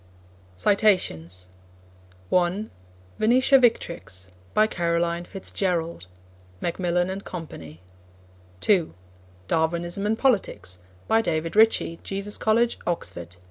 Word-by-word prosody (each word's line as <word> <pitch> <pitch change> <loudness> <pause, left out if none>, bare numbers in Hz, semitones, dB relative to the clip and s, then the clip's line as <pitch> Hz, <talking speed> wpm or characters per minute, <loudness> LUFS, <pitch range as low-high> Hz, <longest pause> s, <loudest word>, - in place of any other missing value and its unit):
(1) 200 - +3 2.4
Venetia 255 +5 +5
Victrix. 170 - -1 0.3
By 215 - +6
Caroline 170 -3 0
Fitz 195 0 -6
Gerald. 170 - -1 0.5
(Macmillan 175 +1 0
and 195 +1 -5
Co.) 170 -3 -6 1.1
(2) 185 -6 +3 0.5
Darwinism 170 +4 0
and 220 +1 +1
Politics. 190 - 0 0.3
By 225 0 +4
David 165 -4 -2
Ritchie, 215 -6 +3
Jesus 200 +1 -3
College, 230 +2 +2
Oxford. 85 - -4
175 Hz, 90 wpm, -25 LUFS, 165-215 Hz, 2.4 s, By